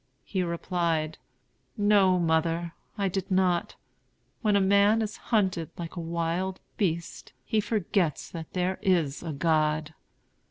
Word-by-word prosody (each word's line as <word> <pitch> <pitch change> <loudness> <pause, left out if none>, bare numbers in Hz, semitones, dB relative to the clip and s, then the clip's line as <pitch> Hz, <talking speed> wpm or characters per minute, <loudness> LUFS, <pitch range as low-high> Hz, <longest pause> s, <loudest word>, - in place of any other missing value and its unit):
He 190 - -2
replied: 170 -2 -1 0.6
"No, 205 -3 +4
mother, 165 0 +1 0.2
I 200 -1 +1
did 190 0 -3
not. 185 -2 +1 0.7
When 210 -3 +2
a - - +5
man 200 +3 +4
is 215 -1 -5
hunted 190 -8 +1
like 170 0 -6
a - - -4
wild 170 +3 -2 0.2
beast, 170 -4 -2
he 220 - +1
forgets 195 - 0
that 160 -2 -8
there 185 +1 -1
is 165 -7 +1
a 165 - -4
God." 155 0 +1
175 Hz, 130 wpm, -28 LUFS, 165-195 Hz, 0.7 s, a